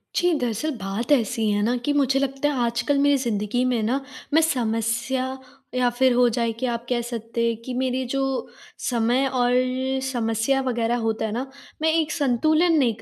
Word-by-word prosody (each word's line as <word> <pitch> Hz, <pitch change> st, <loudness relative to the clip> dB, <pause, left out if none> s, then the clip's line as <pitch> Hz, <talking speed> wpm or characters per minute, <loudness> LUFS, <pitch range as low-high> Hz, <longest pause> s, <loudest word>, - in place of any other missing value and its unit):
जी, 355 Hz, 0 st, +3 dB
दरअसल 245 Hz, +6 st, -1 dB
बात 200 Hz, +6 st, -4 dB
ऐसी 225 Hz, -4 st, +2 dB
है 205 Hz, 0 st, +1 dB
ना 240 Hz, +3 st, +1 dB
कि 290 Hz, -, +1 dB
मुझे 275 Hz, -1 st, +2 dB
लगता 275 Hz, +1 st, 0 dB
है 255 Hz, -5 st, 0 dB
आजकल 235 Hz, +4 st, 0 dB
मेरी 285 Hz, 0 st, +4 dB
ज़िंदगी 235 Hz, -1 st, -1 dB
में 245 Hz, -3 st, +1 dB
ना, 255 Hz, +6 st, 0 dB, 0.3 s
मैं 320 Hz, -, +6 dB
समस्या 250 Hz, -1 st, -1 dB, 0.4 s
या 250 Hz, -1 st, +3 dB
फिर 255 Hz, +1 st, +2 dB
हो 245 Hz, 0 st, +4 dB
जाए 235 Hz, -2 st, 0 dB
कि 255 Hz, -, -1 dB
आप 235 Hz, -1 st, -2 dB
कह 245 Hz, -1 st, +1 dB
सकते 235 Hz, -1 st, -3 dB
हैं 230 Hz, -1 st, +1 dB
कि 250 Hz, +2 st, -6 dB
मेरी 260 Hz, 0 st, 0 dB
जो 275 Hz, -, 0 dB, 0.6 s
समय 245 Hz, +2 st, +1 dB
और 245 Hz, -2 st, +1 dB, 0.5 s
समस्या 240 Hz, 0 st, 0 dB
वग़ैरह 235 Hz, -1 st, 0 dB
होता 225 Hz, -1 st, -1 dB
है 220 Hz, -, -3 dB
ना, 245 Hz, +5 st, -2 dB, 0.4 s
मैं 320 Hz, 0 st, +3 dB
एक 325 Hz, -1 st, +1 dB
संतुलन 310 Hz, +5 st, +2 dB
नहीं 245 Hz, -6 st, +2 dB
245 Hz, 185 wpm, -24 LUFS, 230-270 Hz, 0.6 s, मैं